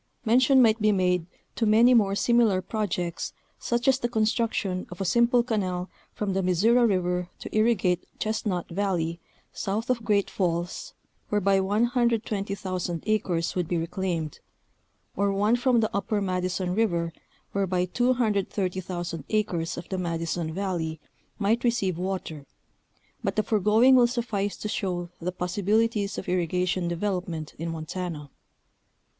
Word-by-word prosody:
Mention 255 +3 +5
might 225 -1 +3
be 215 0 +4
made 180 -3 +1 0.3
to 225 - +1
many 230 +4 +6
more 200 -4 +4
similar 230 -3 +3
projects, 180 -4 -3 0.3
such 240 +2 -1
as 265 -1 +4
the 240 - -1
construction 220 -4 0
of 180 - -10
a 195 - -1
simple 235 +5 +4
canal 190 -6 -2 0.2
from 205 -2 -2
the 195 - +1
Missouri 220 +7 +4
River 180 -3 0
to - - -8
irrigate 210 -6 +2
Chestnut 215 -5 -2
Valley, 170 -3 -1 0.3
south 220 +5 -2
of 235 -2 -1
Great 205 -3 +2
Falls, 175 - -2 0.3
whereby 200 -1 +3
120,000 200 - 0
acres 190 -6 0
would 180 -3 -1
be 175 - 0
reclaimed; 165 -2 -3 0.8
or 200 +1 +1
one 205 +4 +2
from 245 -1 +3
the 220 - -1
Upper 200 +1 0
Madison 185 -1 -1
River 170 -6 0 0.4
whereby 185 -2 0
230,000 190 - -1
acres 180 -6 -1
of 170 - -7
the 190 - -2
Madison 165 -1 -2
Valley 165 -4 -3 0.4
might 220 +3 +1
receive 195 -8 +1
water, 180 -6 -4 0.8
but - - -1
the 215 - +2
foregoing 220 +5 +4
will 245 -2 +6
suffice 230 -5 -2
to - - -4
show 180 -4 -2
the 180 +2 -2
possibilities 205 +4 0
of - - -5
irrigation 180 0 0
development 175 -3 -3
in 165 +1 -3
Montana. 160 -2 -5
195 Hz, 135 wpm, -26 LUFS, 180-220 Hz, 0.8 s, many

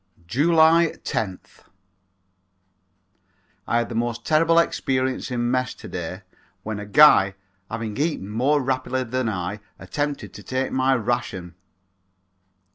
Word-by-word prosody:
July 160 - +4
10th. 95 -4 -5 2.0
I 115 - +1
had 120 0 0
the - - -7
most 120 +1 -2
terrible 165 +2 +3
experience 130 -5 0
in 120 -1 -1
mess 130 0 -1
to - - -11
day 90 +2 -6 0.4
when 110 -1 -4
a 105 - -7
guy 100 -6 +6 0.3
having 115 -2 -4
eaten 145 - -1
more 130 +8 +1
rapidly 130 0 -1
than 125 0 -2
I 95 +1 -4 0.2
attempted 145 -1 -4
to - - -10
take 130 +1 -2
my 130 0 +2
ration. 115 -7 -3
125 Hz, 120 wpm, -23 LUFS, 110-140 Hz, 2.0 s, guy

